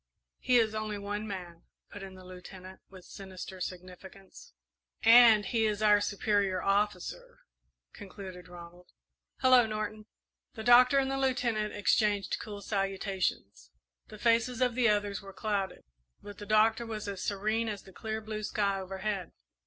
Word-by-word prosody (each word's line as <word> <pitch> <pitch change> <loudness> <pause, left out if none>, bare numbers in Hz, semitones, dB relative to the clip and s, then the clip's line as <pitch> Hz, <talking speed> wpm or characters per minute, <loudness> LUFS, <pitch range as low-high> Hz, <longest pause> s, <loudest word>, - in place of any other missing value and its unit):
"He 250 - +3
is 220 -2 +2
only 215 -1 -3
one 205 +1 -4
man," 175 -4 -8 0.3
put 205 - -9
in 190 -1 -9
the 185 0 -13
Lieutenant, 185 +1 -11
with 185 -2 -14
sinister 190 -1 -9
significance. 185 - -9 0.5
"And 225 -2 +7
he 225 +2 +1
is 210 0 -2
our 210 -1 +5
superior 200 -2 0
officer," 200 -1 -2 0.5
concluded 190 -3 -10
Ronald. 175 0 -13 0.5
"Hello, 255 -3 +6
Norton!" 215 0 -5 0.5
The 220 - -6
Doctor 250 +3 +6
and 270 0 +1
the 270 - -2
Lieutenant 240 -5 0
exchanged 205 -1 +1
cool 205 -2 -8
salutations. 195 - -3 0.4
The 215 - -11
faces 230 +2 +1
of 250 -1 +2
the 240 -1 +3
others 205 -1 0
were 195 -1 -11
clouded, 200 -2 -3 0.4
but 205 -1 -11
the 205 - -9
Doctor 220 +2 +3
was 215 -2 -5
as 195 -2 -5
serene 215 +3 -1
as 205 -2 -6
the 190 - -16
clear 220 +3 -5
blue 215 0 -5
sky 200 -2 -1
overhead. 190 0 -4
205 Hz, 150 wpm, -30 LUFS, 190-220 Hz, 0.5 s, And